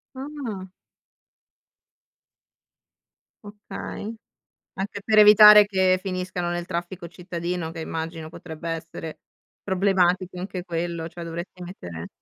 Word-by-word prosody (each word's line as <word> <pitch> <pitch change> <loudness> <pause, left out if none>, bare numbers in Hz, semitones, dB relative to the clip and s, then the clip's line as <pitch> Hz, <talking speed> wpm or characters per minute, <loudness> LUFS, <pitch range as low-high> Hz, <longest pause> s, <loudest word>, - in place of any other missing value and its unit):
Ah. 260 -9 -6 2.8
Okay. 210 +1 -7 0.6
Anche 200 +1 -4
per 215 -1 +5
evitare 210 0 +10
che 190 -2 +2
finiscano 185 -2 -3
nel 175 0 -3
traffico 175 0 -5
cittadino, 175 -1 -4
che 165 - -8
immagino 160 0 -5
potrebbe 165 0 -8
essere 165 -1 -6 0.4
problematico 185 -1 +1
anche 185 -1 -5
quello, 170 -1 -3
cioè 170 +1 -9
dovresti 170 +2 -7
mettere 85 - -8
180 Hz, 100 wpm, -24 LUFS, 170-195 Hz, 2.8 s, evitare